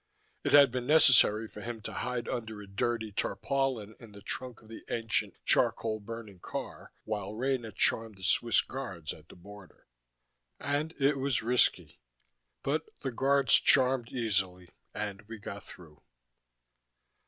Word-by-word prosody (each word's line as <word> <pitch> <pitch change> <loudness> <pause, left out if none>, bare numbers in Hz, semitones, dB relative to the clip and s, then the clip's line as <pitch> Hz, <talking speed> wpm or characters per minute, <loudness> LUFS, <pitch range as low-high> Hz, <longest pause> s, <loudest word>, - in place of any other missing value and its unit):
It - - -1
had 140 -3 +8
been 125 0 -3
necessary 125 -8 +6
for 105 - -11
him 120 0 -6
to - - -6
hide 125 -1 -3
under 110 -3 -4
a 105 - -9
dirty 110 +3 -2
tarpaulin 120 +1 -2
in 115 -4 -14
the 100 0 -13
trunk 125 0 -5
of - - -18
the 115 - -10
ancient 115 -1 -1
charcoal 110 -1 +2
burning 110 -3 -9
car, - - -7
while 105 -1 -4
Rena 125 -2 -1
charmed 110 0 +1
the 95 - -13
Swiss 115 +4 +3
Guards 100 - -6
at 75 -1 -17
the - - -13
border. 100 +1 -15 0.7
And 145 +3 -2
it 140 0 +2
was 135 -4 0
risky. 125 - +1 0.6
But 155 +3 -1
the 135 - -3
Guards 140 +3 +2
charmed 130 -3 +5
easily, 95 -7 -2 0.3
and 100 -1 -4
we 115 0 -8
got 100 -1 -8
through. 80 -4 -14
115 Hz, 150 wpm, -30 LUFS, 105-130 Hz, 0.7 s, had